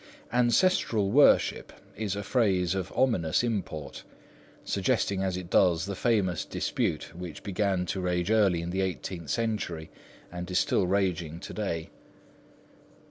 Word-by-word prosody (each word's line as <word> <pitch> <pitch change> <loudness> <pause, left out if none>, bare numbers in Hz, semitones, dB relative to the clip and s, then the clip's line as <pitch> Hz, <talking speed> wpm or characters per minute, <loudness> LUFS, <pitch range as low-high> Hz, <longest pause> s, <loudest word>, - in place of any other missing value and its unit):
"Ancestral 120 - +2
worship" 145 +5 +4 0.2
is 105 -3 -2
a 100 - -4
phrase 95 -6 +1
of 95 -1 -3
ominous 110 -9 +2
import, 100 -10 -3 0.6
suggesting 100 -1 0
as 95 -1 -1
it 90 -1 -8
does 85 -2 +3
the 100 - -4
famous 100 -4 +1
dispute - - -2
which 85 -3 -8
began 95 -2 0
to 95 +1 -3
rage 90 +1 0
early 100 -6 +3
in 85 - -4
the 95 +1 -1
eighteenth 85 -2 -4
century 105 -8 -2 0.4
and 90 0 -6
is 90 - 0
still 95 - +2
raging 90 -4 0
to - - -8
day. 85 -6 -3
95 Hz, 135 wpm, -28 LUFS, 90-105 Hz, 0.6 s, worship